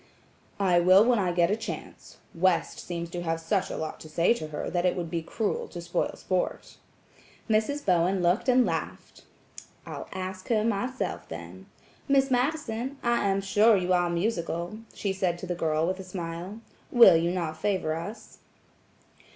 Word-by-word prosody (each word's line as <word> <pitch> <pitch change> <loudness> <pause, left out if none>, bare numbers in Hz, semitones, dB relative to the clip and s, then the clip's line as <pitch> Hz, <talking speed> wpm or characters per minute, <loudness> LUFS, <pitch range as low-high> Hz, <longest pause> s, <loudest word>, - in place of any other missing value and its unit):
"I 180 -3 +4
will 185 +4 +6
when 240 -2 +3
I 185 -3 +1
get 175 +1 +2
a - - +3
chance. 225 +1 -8 0.2
West 180 0 +1
seems 170 -1 -5
to 175 - -4
have 165 -1 -1
such 180 +4 -1
a - - -4
lot 155 - -5
to 155 - -11
say 170 +7 +3
to 155 -10 -6
her 155 - -5
that 175 -1 -1
it 180 - +2
would 170 -3 -4
be 170 -1 -1
cruel 205 +6 -2
to 175 - -8
spoil 170 0 -2
sport." 185 -1 -3 0.7
Mrs. 225 +7 0
Bowen 180 0 +2
looked 180 +9 +2
and 250 0 +5
laughed: 165 -4 -5 0.6
"I'll - - -7
ask 185 0 -6
her 220 -3 +2
myself 225 - -2
then. 85 +3 -9 0.4
Miss 270 -1 +3
Madison, 255 -1 -1
I 235 -3 +2
am 195 0 +1
sure 210 +3 +4
you 185 0 +1
are 175 -1 +2
musical," 170 +1 -2
she 195 -2 -3
said 185 -2 0
to 180 - -7
the 180 - -2
girl, 160 -2 0
with 185 +2 -2
a - - -6
smile. 180 +3 -6 0.3
"Will 235 -8 +8
you 165 +1 +2
not 165 -3 -3
favor 185 -6 0
us?" 170 +8 -7
185 Hz, 175 wpm, -27 LUFS, 170-215 Hz, 0.7 s, Will